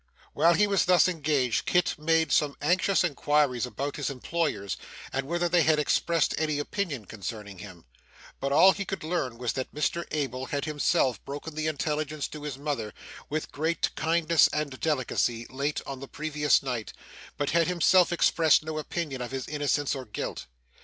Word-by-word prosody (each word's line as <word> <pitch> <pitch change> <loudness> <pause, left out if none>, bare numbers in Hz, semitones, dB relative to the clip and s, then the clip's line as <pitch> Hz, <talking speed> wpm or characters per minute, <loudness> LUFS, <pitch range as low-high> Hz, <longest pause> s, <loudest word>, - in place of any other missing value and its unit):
While 170 +1 +4
he 210 - +4
was 200 -2 +2
thus 180 0 +5
engaged, 150 -8 0
Kit 180 0 +2
made 160 +1 +2
some 145 -2 +2
anxious 185 +5 +2
inquiries 145 -5 +1
about 140 +3 -4
his 145 - -2
employers, 140 - -2 0.4
and 135 0 -2
whether 175 +2 0
they 175 0 +3
had 160 -1 +4
expressed 165 +2 +1
any 155 -2 0
opinion 145 - -3
concerning 100 -1 -7
him; 90 -6 -11 0.5
but 140 - -2
all 175 +7 +7
he 200 - -3
could 195 -2 -5
learn 155 -8 -2
was 125 -1 -2
that 130 - -4
Mr 170 +3 0
Abel 135 -4 -3
had 140 0 -2
himself 140 -6 +1
broken 145 +3 -7
the 155 +1 -2
intelligence 155 0 -2
to 150 - -8
his 145 -3 -5
mother, 140 -7 -3 0.3
with 155 +2 -3
great 160 +3 -1
kindness 165 0 +3
and 145 -3 -3
delicacy, 125 -5 0
late 140 +3 -2
on 135 -1 -6
the 135 - -8
previous 150 -1 +1
night, 125 -5 -4 0.4
but 145 0 -1
had 165 0 +3
himself 180 +1 +4
expressed 165 -3 +4
no 155 0 -4
opinion 150 -4 -4
of 120 - -4
his 135 -1 -5
innocence 145 -1 0
or 135 -2 -5
guilt. 105 - -5
150 Hz, 175 wpm, -27 LUFS, 135-165 Hz, 0.5 s, all